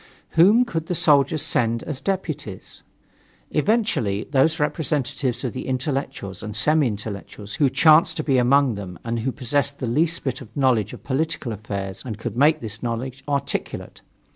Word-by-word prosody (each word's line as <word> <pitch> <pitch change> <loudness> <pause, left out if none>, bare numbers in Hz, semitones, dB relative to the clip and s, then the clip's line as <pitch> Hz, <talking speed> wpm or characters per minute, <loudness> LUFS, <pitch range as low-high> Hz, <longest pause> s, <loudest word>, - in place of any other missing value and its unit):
Whom 205 +9 +5
could 165 -7 -4
the 180 - -1
soldiers 150 0 +4
send 115 -6 +1
as 145 -4 -5
deputies? 160 - -4 0.7
Eventually, 150 - +1
those 155 +4 +3
representatives 145 -4 -1
of 125 - -2
the 130 - -6
intellectuals 130 - -3
and 105 0 -6
semi 150 +5 +4
intellectuals 105 -1 -6
who 140 - +5
chanced 160 +3 +5
to 155 - -1
be 135 -4 +2
among 135 +1 +4
them 95 -4 -7
and 115 0 -2
who 130 +4 -1
possessed 140 +2 -1
the 130 - -4
least 160 +8 +1
bit 130 -2 -3
of 115 -1 -12
knowledge 130 -6 +2
of - - -11
political 145 -2 -2
affairs 100 -2 -5
and 110 -5 -5
could 110 - -5
make 150 +4 +4
this 110 -1 -6
knowledge 125 +3 -4
articulate. 140 -1 -3
135 Hz, 165 wpm, -23 LUFS, 115-155 Hz, 0.7 s, Whom